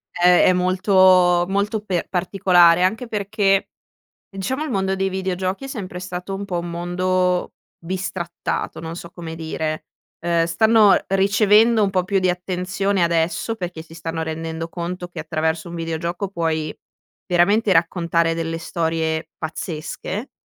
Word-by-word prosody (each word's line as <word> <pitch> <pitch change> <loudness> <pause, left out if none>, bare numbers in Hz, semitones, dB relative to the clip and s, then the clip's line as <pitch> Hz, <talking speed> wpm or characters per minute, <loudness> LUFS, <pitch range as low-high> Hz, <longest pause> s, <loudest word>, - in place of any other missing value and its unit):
È 180 0 +5
è 185 - +5
molto 185 -1 +4
molto 205 +2 0
per 185 -4 -2
particolare, 180 -1 +4
anche 220 +7 0
perché 210 -1 -4 0.9
ehm, 195 - -13
diciamo, 260 +10 -2
il - - -5
mondo 190 -4 0
dei 195 0 0
videogiochi 190 +2 -2
è 270 - -5
sempre 195 -9 -6
stato 180 +1 -5
un 200 - -5
po' 180 -3 -3
un 170 0 -5
mondo 180 +1 0 0.3
bistrattato, 175 -2 -4
non 165 0 -6
so 170 0 -9
come 165 -3 -7
dire, 160 -1 -4 0.3
uhm, 170 0 +1
stanno 210 +5 +5
ricevendo 210 +3 +4
un 200 - +2
po' 185 -2 +1
più 195 +1 +1
di 185 -1 +1
attenzione 185 +2 -1
adesso, 170 +6 0
perché 175 -5 -5
si 165 0 -15
stanno 165 0 -4
rendendo 160 +1 -4
conto 175 +1 -5
che 175 - -9
attraverso 160 +1 -2
un 170 - -7
videogioco 170 +3 -3
puoi 160 -4 -2 0.5
veramente 195 +4 +3
raccontare 170 -1 +2
delle 165 0 -3
storie 160 -1 -2
pazzesche, 165 - -5
180 Hz, 145 wpm, -21 LUFS, 165-195 Hz, 0.9 s, È